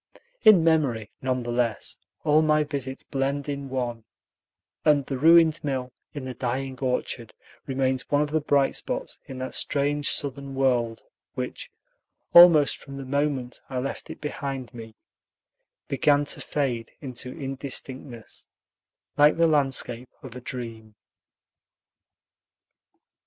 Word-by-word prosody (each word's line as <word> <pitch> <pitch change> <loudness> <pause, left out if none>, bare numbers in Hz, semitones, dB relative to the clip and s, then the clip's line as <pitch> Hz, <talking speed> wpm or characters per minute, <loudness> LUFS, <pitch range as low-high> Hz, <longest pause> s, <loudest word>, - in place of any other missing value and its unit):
In 200 -6 +8
memory, 135 -10 +1
none 130 -1 -1
the 120 - -4
less, 120 -2 -1 0.2
all 155 0 +4
my 155 -1 +3
visits 135 -3 -4
blend 140 +1 -2
in 140 -1 -4
one, 120 -3 -3 0.8
and 145 -3 +4
the 135 - -3
ruined 165 +1 +6
mill 130 -3 -2 0.2
in 140 -3 -5
the 130 - -5
dying 130 +1 -3
orchard 125 -3 -2 0.3
remains 130 -1 -1
one 145 +1 +3
of 150 - -5
the 155 0 +1
bright 140 -2 +2
spots - - -3
in 130 - -7
that 130 0 -5
strange 145 +1 0
Southern 140 -1 -2
world 120 -4 +1 0.3
which, - - -5 0.6
almost 170 -4 +8
from 140 -1 -10
the 135 - -6
moment 135 -2 -1
I 130 - -4
left 135 +2 -4
it - - -8
behind 135 -4 -5
me, 115 -2 -10 0.9
began 145 +1 +3
to - - -9
fade 125 -6 -2
into 130 -3 -5
indistinctness, 135 -3 -6 0.7
like 150 +2 +5
the 165 - +4
landscape 135 -5 +1
of 130 -3 -9
a 125 - -7
dream. 115 -4 -7
135 Hz, 130 wpm, -25 LUFS, 125-145 Hz, 0.9 s, In